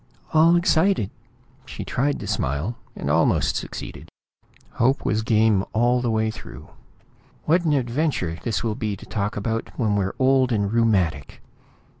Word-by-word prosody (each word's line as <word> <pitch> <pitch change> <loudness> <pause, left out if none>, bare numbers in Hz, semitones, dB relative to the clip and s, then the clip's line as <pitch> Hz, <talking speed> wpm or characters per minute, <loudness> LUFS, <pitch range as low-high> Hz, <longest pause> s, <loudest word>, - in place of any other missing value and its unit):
"All 165 +2 +6
excited!" 170 - +2 0.6
She - - -7
tried 140 +3 0
to - - -5
smile, 70 - -2 0.2
and - - -5
almost 80 +3 +2
succeeded. - - -6 0.7
Hope 130 +3 +2
was 110 +1 +1
game 110 -3 +3
all 120 +3 +2
the 120 - -1
way 110 0 +1
through. - - -11 0.8
"What 170 +3 +2
an 155 - +2
adventure 125 - -1
this 115 -3 -2
will 115 -2 0
be 105 -1 -3
to - - -12
talk 105 -1 -3
about 115 +2 -2
when 110 -5 +1
we're 95 -1 -1
old 130 -1 +3
and 100 -2 0
rheumatic!" 95 -12 0
115 Hz, 150 wpm, -23 LUFS, 100-130 Hz, 0.8 s, All